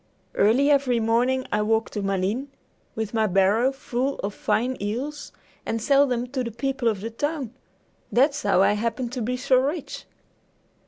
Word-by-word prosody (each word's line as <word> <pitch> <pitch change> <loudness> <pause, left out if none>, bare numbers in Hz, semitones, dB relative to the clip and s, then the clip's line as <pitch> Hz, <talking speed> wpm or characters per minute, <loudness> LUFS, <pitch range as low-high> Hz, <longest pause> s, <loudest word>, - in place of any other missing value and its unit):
Early 260 +8 +3
every 265 -4 +2
morning 245 +4 +1
I 210 - +1
walk 220 +1 0
to 210 - -3
Malines 195 +7 -1 0.5
with 220 -1 -4
my 220 -1 +2
barrow 200 +7 +3
full 270 0 -2
of 200 +1 -2
fine 250 +5 0
eels, 260 +9 -4 0.3
and 230 - -2
sell 275 +5 +4
them 245 -1 -1
to 260 -2 -1
the 235 - -3
people 260 +2 -2
of 210 -4 0
the 225 +2 -5
town. 285 -1 -3 0.6
That's 280 +6 +3
how 190 - +3
I 205 - +4
happen 230 +3 -2
to 250 0 -5
be 250 +3 -2
so 260 0 +3
rich!" 285 +4 -2
240 Hz, 170 wpm, -24 LUFS, 220-270 Hz, 0.6 s, sell